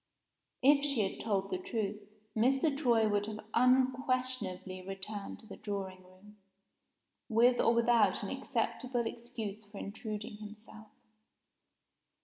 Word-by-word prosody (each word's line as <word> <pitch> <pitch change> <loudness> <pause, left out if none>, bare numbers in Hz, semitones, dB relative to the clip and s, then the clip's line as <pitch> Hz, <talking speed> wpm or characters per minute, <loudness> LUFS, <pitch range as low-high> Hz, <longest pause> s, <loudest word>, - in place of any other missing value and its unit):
If 280 +1 +6
she 270 -9 +2
had - - -8
told 195 -3 -1
the 185 - -1
truth, 210 +1 -3 0.3
Mr. 270 +6 +3
Troy 240 -6 +3
would 205 0 +1
have 215 0 -5
unquestionably 255 -7 +1
returned 195 +2 -6
to - - -17
the - - -10
drawing 195 -3 -4
room, 185 +3 -18 0.9
with 240 +2 +5
or - - +5
without 230 -5 +4
an 200 - -3
acceptable 250 -1 -1
excuse 225 -3 -5
for 205 0 -13
intruding 210 0 -5
himself. 215 +1 -11
220 Hz, 125 wpm, -33 LUFS, 200-245 Hz, 0.9 s, If